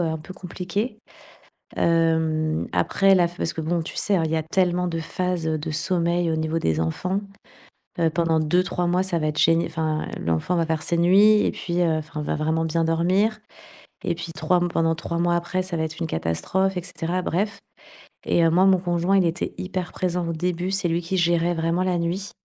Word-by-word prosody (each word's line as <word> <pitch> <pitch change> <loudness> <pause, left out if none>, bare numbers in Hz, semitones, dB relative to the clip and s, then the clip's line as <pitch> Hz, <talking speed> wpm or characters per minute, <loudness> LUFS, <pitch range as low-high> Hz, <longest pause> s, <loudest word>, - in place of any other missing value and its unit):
un 160 -2 -1
peu 170 +5 -11
compliquée. 195 +5 -4 0.8
Hem, 160 -1 +1
après 195 -1 +3
la 175 -2 +4
f 175 +1 -15
parce - - -2
que 160 - -4
bon 170 +2 -1
tu 160 - -7
sais, 205 - +1
hein, 165 - +1
il - - -2
y - - +1
a 160 - -1
tellement 180 +1 +1
de 165 -1 -2
phases, 180 0 -2
heu, 155 0 0
de 155 +1 -5
sommeil 170 +1 0
au 160 - 0
niveau 160 +1 -1
des 80 - 0
enfants. 180 - -1 0.8
Heu, 165 -1 +3
pendant 165 -1 +1
2-3 175 +2 +1
mois 180 +2 +2
ça 175 -3 0
va 155 - 0
être 150 0 -3
gén 165 +1 +4
enfin 155 -1 -2
l'enfant 85 - 0
va 165 - +1
faire 160 -1 -1
ses 170 - 0
nuits 205 +5 +5
et - - 0
puis, 175 0 -2
heu, 160 -2 +2
enfin 155 0 -6
va - - -2
vraiment 160 +2 0
bien 165 +1 0
dormir 185 +7 +1 0.7
et 175 - 0
puis 165 0 -7
3 180 +1 +1
mo 175 - +1
pendant 165 -1 +1
3 170 +1 -4
mois 175 0 +2
après, 175 +2 -2
ça 185 -2 -4
va 160 - 0
être 160 +1 -5
une 165 - -1
catastrophe 185 - -1
et 180 - -3
cetera 180 0 -3
bref 200 +4 -2 0.7
et 170 - +3
heu, - - +5
moi, 180 +3 +4
mon 190 -1 +5
conjoint, 175 +2 +1
il 190 - +3
était 170 +1 -2
hyper 185 -1 -4
présent 180 -1 -1
au 165 - -2
début, 180 +2 -2
c'est 195 -2 0
lui 165 +1 0
qui 175 +3 -2
gérait 170 0 +2
vraiment 165 +2 0
la 180 -2 0
nuit. 180 +4 -3
170 Hz, 220 wpm, -23 LUFS, 160-180 Hz, 0.8 s, nuits